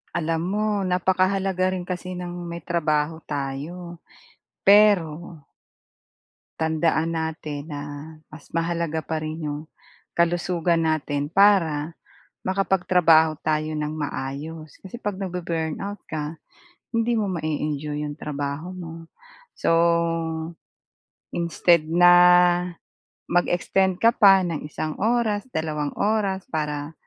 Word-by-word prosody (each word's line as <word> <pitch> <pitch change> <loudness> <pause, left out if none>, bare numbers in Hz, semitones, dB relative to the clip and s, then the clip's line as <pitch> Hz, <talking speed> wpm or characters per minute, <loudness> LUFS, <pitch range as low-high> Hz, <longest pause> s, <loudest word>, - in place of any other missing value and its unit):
Alam 165 -1 0
mo 210 +3 0 0.2
napakahalaga 185 +1 +1
rin 180 - -4
kasi 180 0 -5
ng 180 -1 -5 0.2
may 170 0 -7
trabaho 160 -2 0
tayo 150 +5 -5 0.7
pero 175 -6 +4 1.2
tandaan 160 +1 +1
natin 155 -2 -5
na, 145 -2 -5 0.5
mas 155 -1 -12
mahalaga 165 -2 -1
pa 160 +1 -3
rin 155 +1 -5
'yong 145 0 -3 0.5
kalusugan 170 -1 +1
natin, 145 -2 -1
para 165 -5 +3 0.5
makapagtrabaho 180 -5 +3
tayo 155 0 0
ng 150 0 -3
maayos. 150 +1 -5
Kasi 195 +5 -9
'pag 205 -4 -3
nabu-burnout 180 +1 -4
ka 155 0 -3 0.6
hindi 230 +1 +1
mo 210 -2 0
mae-enjoy 150 -2 -3
'yong 145 -1 -5
trabaho 145 +5 -4
mo. 165 -2 -9 0.5
So, - - +1 1.6
instead 170 -1 +2
na 175 +2 +6 1.1
mag-extend 180 +1 +1
ka 230 - +7
pa 195 -5 +6
ng 165 -4 -2
isang 155 0 -5
oras 225 0 +1
dalawang 155 - -3
oras 200 -3 0
para 150 -1 -3
165 Hz, 105 wpm, -24 LUFS, 155-185 Hz, 1.6 s, ka